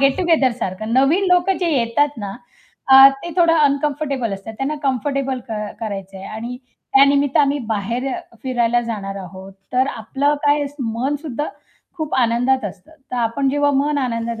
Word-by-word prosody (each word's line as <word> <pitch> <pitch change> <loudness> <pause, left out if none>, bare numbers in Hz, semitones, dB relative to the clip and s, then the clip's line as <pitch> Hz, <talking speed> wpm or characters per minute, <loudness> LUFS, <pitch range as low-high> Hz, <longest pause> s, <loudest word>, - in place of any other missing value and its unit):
Gate 275 -1 +3
टूगेदरसारखं. 250 - 0
नवीन 280 +10 +3
लोक 360 +1 +3
जे 345 -2 +1
येतात 235 +5 +2
ना, 200 -2 -5 0.6
अ, 270 +1 +10
ते 345 - -5
थोडं 335 -2 +4
अनकम्फर्टेबल 280 -4 0
असतात, 195 +3 -7
त्यांना 275 +3 -1
कम्फर्टेबल 270 0 -1
क - - -4 0.3
करायचंय 195 -3 -6
आणि 235 +4 -6 0.4
त्या 275 - +8
निमित्त 280 -1 +2
आम्ही 285 0 +3
बाहेर 230 +5 -2
अ, - - -4 0.2
फिरायला 240 -2 +1
जाणार 195 -2 -5
आहोत. 190 +2 -11 0.2
तर 255 +1 +2
आपलं 270 +6 0
काय 290 0 +3
स 290 - -19
मन 250 +5 -1
सुद्धा 295 -1 -3 0.5
खूप 310 -3 -3
आनंदात 245 +1 +2
असतं. 195 - -8 0.2
तर 250 - -3
आपण 240 +4 0
जेव्हा 290 +1 +2
मन 290 +1 +1
आनंदात 230 -3 -2
260 Hz, 165 wpm, -20 LUFS, 230-285 Hz, 0.6 s, अ